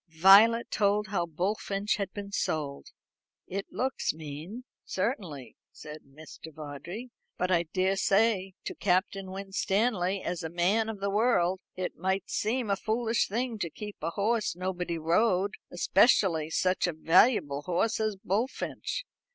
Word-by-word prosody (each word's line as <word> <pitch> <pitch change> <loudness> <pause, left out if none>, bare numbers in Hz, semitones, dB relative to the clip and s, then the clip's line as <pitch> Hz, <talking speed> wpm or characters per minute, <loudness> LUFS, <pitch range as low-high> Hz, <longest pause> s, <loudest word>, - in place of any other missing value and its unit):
Violet 215 +6 +7
told 210 0 +1
how 175 -4 -1
Bullfinch 195 +5 -1
had 200 -2 -3
been 200 -1 -7
sold. 145 -7 -2 0.6
"It 195 +1 -4
looks 260 - -1
mean, 160 - -8 0.2
certainly," 180 - -4
said 150 0 -10
Mr. 155 +3 -12
Vawdrey; 160 - -8 0.3
"but 180 +1 0
I 170 -1 +3
daresay 195 +1 +2
to - - -3
Captain 190 0 0
Winstanley, 195 0 -1
as 175 -1 -3
a 160 - -4
man 190 +7 +1
of 210 -3 -6
the 200 0 0
world, 195 -4 +2 0.2
it 185 -1 -4
might 190 +3 -1
seem 225 0 0
a - - +3
foolish 225 +2 0
thing 230 +1 -2
to 170 - -2
keep 210 +5 -8
a 160 - -1
horse 210 +2 0
nobody 180 -1 -3
rode; 185 +4 +2 0.2
especially 175 -3 +3
such 185 +2 +1
a 175 - -2
valuable 160 - +3
horse 180 +8 0
as 215 -1 0
Bullfinch. 220 - -3
190 Hz, 140 wpm, -29 LUFS, 170-215 Hz, 0.6 s, Violet